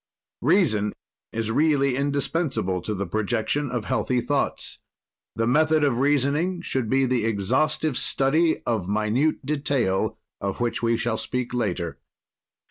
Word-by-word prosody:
"Reason 110 - +2 0.4
is 115 0 -2
really 140 -1 +2
indispensable 140 - -1
to 105 +4 -3
the 100 +1 -2
projection 110 - -1
of 120 -3 -3
healthy 125 -1 0
thoughts. 135 +3 -2 0.6
"The 115 - 0
method 155 +5 +3
of 130 -4 +2
reasoning 145 +6 +1
should 130 -8 -2
be 135 +2 +3
the 125 -3 +1
exhaustive 130 +8 0
study 155 +7 +2
of 110 -6 -1
minute 110 +9 +1
detail, 140 -9 0 0.2
of 100 -1 -3
which 120 -1 -1
we 115 0 +2
shall 120 +1 -1
speak 125 -1 -3
later. 100 -8 -2
125 Hz, 130 wpm, -24 LUFS, 110-145 Hz, 0.6 s, method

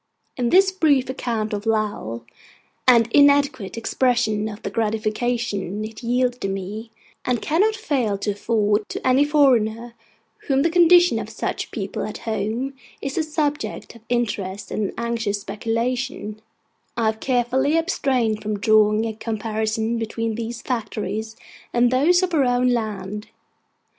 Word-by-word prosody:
In 245 -2 0
this 380 +4 +5
brief 295 -9 +2
account 225 -5 -2
of 205 +2 -4
Lowell, 205 - -1 0.6
and 235 -3 +6
inadequate 280 -7 +3
expression 230 -3 +1
of 210 0 -10
the - - -3
gratification 215 -2 -1
it 220 0 -9
yielded 245 -3 0
me, 195 +4 -5 0.3
and 250 -2 0
cannot 405 - +2
fail 270 - -1
to 205 +1 -1
afford 210 0 0
to - - -3
any 260 +2 +5
foreigner 240 -6 +2 0.5
to - - -23
whom 275 0 +2
the 330 - +2
condition 350 0 +6
of - - -6
such - - -4
people - - -4
at - - -5
home 225 +5 -3 0.3
is 275 0 -4
a - - +1
subject 300 -2 -2
of 230 - -15
interest 205 -5 -2
and 210 -2 -1
anxious 230 -3 -2
speculation, 225 +1 -3 0.6
I 230 - +1
have 220 0 0
carefully 260 +5 +1
abstained 260 - 0
from 210 0 -2
drawing 215 +1 +3
a 225 - -2
comparison 220 +1 -2
between 225 0 -2
these 230 +1 -5
factories 220 -2 -3 0.4
and 240 0 +3
those 335 +8 +4
of 360 -1 -1
our 295 -4 +4
own 245 0 +2
land. 210 -3 -3
230 Hz, 145 wpm, -22 LUFS, 215-260 Hz, 0.6 s, and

